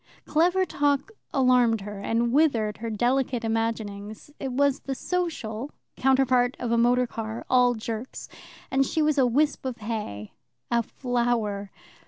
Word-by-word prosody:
Clever 355 +4 +2
talk 285 -4 0 0.2
alarmed 250 -4 +3
her, 205 0 -7
and 230 +3 0
withered 235 -9 +2
her 230 +2 -5
delicate 245 +2 0
imaginings; 220 0 -3
it 270 -2 -3
was 280 +1 +2
the 270 - -4
social; 285 -9 -3 0.3
counterpart 255 -1 +3
of 240 -2 -2
a - - +3
motorcar, 235 -2 0
all 250 -1 +5
jerks, 225 +2 -6 0.4
and 270 +1 +3
she 315 +3 0
was 300 -1 +2
a 255 - +5
wisp 290 +5 +1
of 260 -2 -4
hay, 210 - -5 0.4
a 235 0 +3
flower. 235 -5 -1
245 Hz, 140 wpm, -26 LUFS, 225-270 Hz, 0.4 s, all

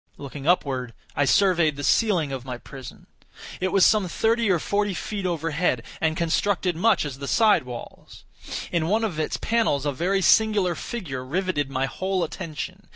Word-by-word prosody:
Looking 140 +1 -7
upward, 130 - +1 0.2
I 145 - +2
surveyed 170 -2 +3
the 145 - -6
ceiling 180 -6 +2
of 130 -2 -4
my 125 -2 -5
prison. 130 0 -11 0.5
It 185 - 0
was 195 0 +5
some 210 -4 +3
thirty 225 +5 +1
or 185 - +4
forty 200 +3 -1
feet 200 +1 -3
overhead, 165 -6 0 0.2
and 160 0 +1
constructed 180 +2 0
much 195 0 +2
as 135 -2 -6
the 140 - -5
side 210 - +4
walls. 120 -1 -10 0.5
In 165 -2 0
one 215 +5 +1
of 185 -8 -2
its 155 - -1
panels 220 -12 +1
a 145 - +1
very 185 +7 0
singular 210 -5 +4
figure 160 - -5
riveted 165 0 -1
my 135 0 0
whole 185 +7 -2
attention. 185 +3 -6
170 Hz, 170 wpm, -24 LUFS, 140-195 Hz, 0.5 s, was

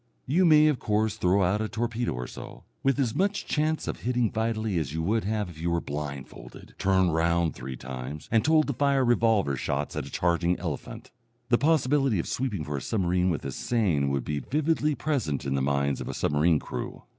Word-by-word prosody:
You 175 +8 +3
may, 155 -2 +7
of 150 -4 +1
course, 105 0 0
throw 95 -2 +2
out 100 +4 +1
a 110 - -2
torpedo 120 +1 -2
or 60 0 -4
so, - - -10 0.2
with 135 0 +2
as 120 -5 +1
much 200 +2 0
chance 155 +1 0
of - - -3
hitting 120 -2 0
vitally 110 -4 -1
as 75 -1 -4
you 80 - -1
would 110 +5 0
have 105 -1 -1
if 80 -2 -11
you 85 - 0
were 85 0 +1
blindfolded, 70 -3 -7
turned 95 -3 +3
round 85 0 +2
three 65 0 -7
times, 65 +4 -7
and 110 -1 +3
told 155 +2 +4
to 140 - -2
fire 140 0 +2
revolver 115 - +2
shots 70 +3 -2
at 65 - -3
a - - -11
charging 85 0 +1
elephant. 80 -6 -6 0.4
The 120 - +4
possibility 140 -5 +2
of 85 - -2
sweeping 115 -10 -2
for 75 -1 -4
a - - -4
submarine 90 -3 +1
with 80 -6 -2
a - - -3
seine 95 -13 0
would 70 -3 -1
be 75 -1 -2
vividly 150 - 0
present 115 - -2
in 70 - -1
the 70 - 0
minds 70 0 0
of - - -5
a - - -4
submarine 75 +2 +2
crew. - - -6
100 Hz, 210 wpm, -27 LUFS, 75-125 Hz, 0.4 s, may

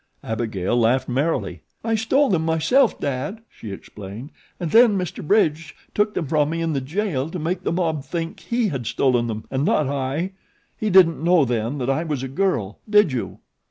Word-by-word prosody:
Abigail 110 -3 -2
laughed 120 +3 +2
merrily. 140 +6 -1 0.2
"I 225 0 0
stole 225 +5 +2
them 165 -4 +2
myself, 165 - +2
Dad," 145 - -3
she 110 - -9
explained, 105 - -9 0.3
"and 170 -3 -3
then 225 -3 +6
Mr. 180 -3 -4
Bridge 160 -4 +1 0.2
took 210 0 +1
them 165 - -1
from 150 +1 +1
me 165 +1 -2
in 165 -1 -1
the 135 - -1
jail 155 -1 -2
to 180 - -5
make 175 +3 -2
the - - -1
mob 165 -4 -1
think 165 +4 -4
he 235 -2 0
had 130 -8 -4
stolen 120 -3 +1
them 110 -1 -5
and 135 +1 0
not 150 -1 +2
I 140 +6 -2 0.4
he 215 - -2
didn't 175 -4 +5
know 170 -3 +4
then 120 +2 -1
that 130 -1 -2
I 155 +5 0
was 150 -5 -3
a - - -2
girl, 130 - -1
did 210 -6 +5
you?" 125 - -4
155 Hz, 195 wpm, -22 LUFS, 130-185 Hz, 0.4 s, then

